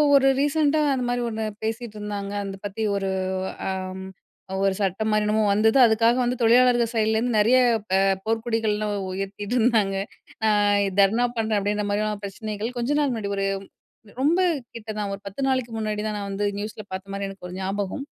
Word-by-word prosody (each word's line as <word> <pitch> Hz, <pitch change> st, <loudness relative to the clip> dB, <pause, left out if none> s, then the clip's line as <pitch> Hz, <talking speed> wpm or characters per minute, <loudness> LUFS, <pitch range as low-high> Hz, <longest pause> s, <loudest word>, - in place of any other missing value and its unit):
ஒரு 270 Hz, -1 st, +5 dB
ரீசென்ட்டா 295 Hz, +1 st, +2 dB
அந்த 255 Hz, -2 st, -1 dB
மாரி 245 Hz, 0 st, 0 dB
ஒண்ணு 220 Hz, -1 st, -3 dB, 0.2 s
பேசிட்டு 225 Hz, 0 st, -4 dB
இருந்தாங்க. 205 Hz, -1 st, -4 dB
அந்த 195 Hz, -1 st, -5 dB
பத்தி 205 Hz, +2 st, -5 dB
ஒரு 195 Hz, -1 st, -1 dB, 0.6 s
அம் 190 Hz, 0 st, -4 dB, 0.6 s
ஒரு 195 Hz, -1 st, +3 dB
சட்டம் 200 Hz, +2 st, 0 dB
மாரி 215 Hz, 0 st, +2 dB
என்னமோ 215 Hz, +1 st, +2 dB
வந்தது 220 Hz, +4 st, +3 dB
அதுக்காக 230 Hz, +1 st, +3 dB
வந்து 245 Hz, +1 st, 0 dB
தொழிலாளர்கள் 240 Hz, 0 st, +4 dB
சைட்லேருந்து 220 Hz, +1 st, +1 dB
நெறைய 230 Hz, +5 st, +5 dB, 0.4 s
அ -, -, +4 dB, 0.3 s
போர்கொடிகள்லாம் 220 Hz, -2 st, 0 dB, 0.2 s
உயர்த்திட்டுருந்தாங்க. 205 Hz, +2 st, 0 dB, 0.7 s
அ -, -, +3 dB, 0.4 s
தர்ணா 215 Hz, +5 st, +4 dB
பண்றேன், 220 Hz, -1 st, +1 dB
அப்டின்ற 205 Hz, +1 st, -1 dB
மாதிரியான 210 Hz, 0 st, -1 dB
பிரச்சனைகள் 215 Hz, +4 st, -5 dB
கொஞ்ச 250 Hz, +5 st, 0 dB
நாள் 285 Hz, -3 st, +2 dB
முன்னாடி 215 Hz, -4 st, -3 dB
ஒரு 195 Hz, -, 0 dB, 0.8 s
ரொம்ப 320 Hz, +6 st, +3 dB, 0.4 s
கிட்ட 225 Hz, -1 st, -9 dB
தா 210 Hz, -, -1 dB
ஒரு 195 Hz, -, -7 dB
10 200 Hz, +7 st, -6 dB
நாளைக்கு 255 Hz, -3 st, 0 dB
முன்னாடிதா 215 Hz, 0 st, -2 dB
நா -, -, -4 dB
வந்து 200 Hz, +1 st, -2 dB
நியூஸில 210 Hz, +1 st, -5 dB
பாத்த 190 Hz, +1 st, -5 dB
மாரி 200 Hz, 0 st, -3 dB
எனக்கு 195 Hz, -2 st, -9 dB
ஒரு 180 Hz, -, -8 dB
ஞாபகம். 200 Hz, +7 st, -3 dB
215 Hz, 160 wpm, -24 LUFS, 200-235 Hz, 0.8 s, ஒரு